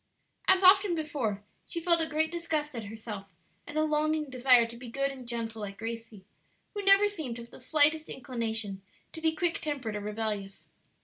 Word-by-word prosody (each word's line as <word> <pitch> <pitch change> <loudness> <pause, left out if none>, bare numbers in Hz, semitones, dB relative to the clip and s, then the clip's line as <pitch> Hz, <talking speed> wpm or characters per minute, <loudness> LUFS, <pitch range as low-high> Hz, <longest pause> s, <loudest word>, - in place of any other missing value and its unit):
As 380 0 +5
often 385 -1 +7
before, 275 -11 -2 0.2
she 335 - -3
felt 335 0 +2
a 320 - 0
great 315 +1 0
disgust 310 -4 -2
at 225 -2 -5
herself, 205 -3 -8 0.3
and 300 - -6
a 310 - +3
longing 305 -1 0
desire 250 -2 +5
to 230 +1 -8
be 240 0 -9
good 275 +3 -1
and 260 -3 -10
gentle 225 -2 -3
like 200 -1 -6
Gracie, 225 -3 -7 0.5
who 410 -1 -4
never 395 +1 +6
seemed 315 - -5
to 235 - -7
have 235 - -16
the - - -12
slightest 305 +4 +3
inclination 225 -6 -3 0.3
to 320 - -7
be 320 0 +1
quick 340 +1 0
tempered 270 -8 -3
or 205 - -3
rebellious. 210 -2 -4
260 Hz, 190 wpm, -30 LUFS, 225-315 Hz, 0.5 s, often